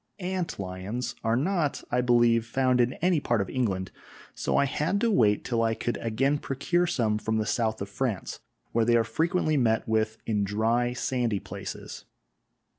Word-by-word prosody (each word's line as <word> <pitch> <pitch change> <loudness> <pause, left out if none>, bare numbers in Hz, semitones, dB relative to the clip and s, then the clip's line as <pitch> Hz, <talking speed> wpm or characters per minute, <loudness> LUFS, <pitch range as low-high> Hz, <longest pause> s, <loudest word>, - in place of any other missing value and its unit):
Ant 185 -2 -3
lions 100 +6 -4
are 115 0 +2
not, 155 +2 0
I 125 - +2
believe, 120 -2 +3
found 130 0 +2
in 120 +2 +1
any 180 -3 +3
part 120 -5 0
of 100 - -2
England, 95 -7 -1 0.4
so - - -1
I - - +4
had 150 +8 0
to 235 - +2
wait 105 - +3
till 115 -2 0
I 115 0 +1
could 120 - -2
again 135 +6 0
procure 175 +7 0
some 110 -9 0
from 110 0 -1
the 110 - 0
south 110 -2 0
of 100 - -8
France, 110 -3 -3 0.3
where 115 - +2
they 120 +1 +3
are 115 - +4
frequently 160 +4 0
met 110 -4 +1
with 110 0 0
in 105 -2 0
dry, 115 +4 +1
sandy 120 -4 -1
places. - - -8
120 Hz, 180 wpm, -27 LUFS, 110-135 Hz, 0.4 s, I